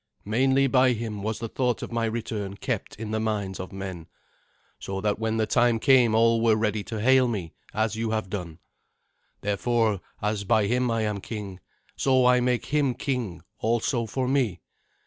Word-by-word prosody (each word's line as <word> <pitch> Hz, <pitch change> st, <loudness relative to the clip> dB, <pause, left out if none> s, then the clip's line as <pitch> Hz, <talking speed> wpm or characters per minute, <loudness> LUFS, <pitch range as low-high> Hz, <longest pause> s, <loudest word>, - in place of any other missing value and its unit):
Mainly 130 Hz, +5 st, +3 dB
by 130 Hz, -1 st, +4 dB
him 110 Hz, -3 st, -4 dB
was 110 Hz, +1 st, -2 dB
the 115 Hz, -, -4 dB
thought 125 Hz, +1 st, -1 dB
of -, -, -6 dB
my 115 Hz, -1 st, 0 dB
return 110 Hz, -3 st, -4 dB
kept -, -, -3 dB
in 110 Hz, 0 st, -6 dB
the 110 Hz, -, 0 dB
minds 105 Hz, -4 st, -2 dB
of 95 Hz, -, -6 dB
men, 95 Hz, -4 st, -6 dB, 0.7 s
so 95 Hz, 0 st, -4 dB
that 105 Hz, +1 st, 0 dB
when 110 Hz, 0 st, -1 dB
the 110 Hz, -, +2 dB
time 120 Hz, +2 st, +3 dB
came 120 Hz, -2 st, +4 dB
all 115 Hz, 0 st, +4 dB
were 115 Hz, -1 st, +4 dB
ready 105 Hz, -1 st, 0 dB
to 110 Hz, -2 st, -5 dB
hail 130 Hz, +3 st, +5 dB
me, 95 Hz, -9 st, -4 dB, 0.2 s
as 110 Hz, +1 st, 0 dB
you 115 Hz, 0 st, -2 dB
have 110 Hz, -2 st, -1 dB
done. 90 Hz, -5 st, -5 dB, 0.8 s
Therefore, 105 Hz, 0 st, +1 dB, 0.2 s
as 105 Hz, -1 st, -1 dB
by 110 Hz, +1 st, +3 dB
him 125 Hz, +3 st, +1 dB
I 115 Hz, -1 st, 0 dB
am 105 Hz, -2 st, -2 dB
king, 100 Hz, -4 st, -6 dB, 0.4 s
so 130 Hz, -2 st, +3 dB
I 125 Hz, 0 st, +5 dB
make 125 Hz, -1 st, 0 dB
him 145 Hz, -4 st, +1 dB
king 115 Hz, -, -3 dB, 0.2 s
also 115 Hz, +1 st, 0 dB
for 130 Hz, +3 st, -2 dB
me. 125 Hz, -9 st, 0 dB
110 Hz, 185 wpm, -26 LUFS, 105-120 Hz, 0.8 s, hail